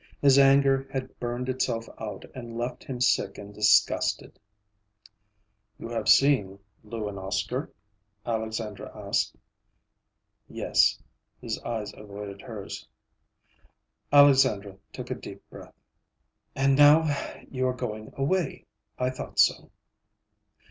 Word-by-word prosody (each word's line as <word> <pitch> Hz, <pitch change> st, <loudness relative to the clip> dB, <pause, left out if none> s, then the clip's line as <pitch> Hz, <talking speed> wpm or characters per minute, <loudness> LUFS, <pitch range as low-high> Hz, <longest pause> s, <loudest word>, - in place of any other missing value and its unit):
His 140 Hz, -1 st, +6 dB
anger 135 Hz, 0 st, +4 dB
had 130 Hz, -1 st, -5 dB
burned 120 Hz, +1 st, -3 dB
itself 125 Hz, -3 st, -1 dB
out 105 Hz, -3 st, -6 dB
and 120 Hz, -2 st, -8 dB
left 120 Hz, +1 st, -4 dB
him 130 Hz, -2 st, -6 dB
sick 115 Hz, -5 st, +1 dB
and 100 Hz, 0 st, -10 dB
disgusted. 105 Hz, +1 st, +2 dB, 1.4 s
"You 115 Hz, -, -8 dB
have 115 Hz, -2 st, -2 dB
seen 105 Hz, -4 st, +4 dB, 0.3 s
Lou 110 Hz, 0 st, -5 dB
and 100 Hz, -1 st, -6 dB
Oscar?" 100 Hz, -, -3 dB, 0.5 s
Alexandra 110 Hz, -2 st, -4 dB
asked. -, -, -1 dB, 1.1 s
"Yes." -, -, +2 dB, 0.4 s
His -, -, -4 dB
eyes 110 Hz, -3 st, -4 dB
avoided 100 Hz, -1 st, -9 dB
hers. 110 Hz, -5 st, -8 dB, 1.2 s
Alexandra 135 Hz, -9 st, +5 dB, 0.2 s
took -, -, -8 dB
a -, -, +2 dB
deep -, -, -11 dB
breath. -, -, -12 dB, 0.8 s
"And 135 Hz, 0 st, +3 dB
now 145 Hz, +3 st, +7 dB, 0.5 s
you 130 Hz, -1 st, 0 dB
are 130 Hz, -, 0 dB
going 110 Hz, -4 st, -5 dB
away. 170 Hz, +6 st, -1 dB, 0.3 s
I 125 Hz, 0 st, 0 dB
thought 130 Hz, -, -8 dB
so." -, -, +3 dB
120 Hz, 115 wpm, -27 LUFS, 105-135 Hz, 1.4 s, now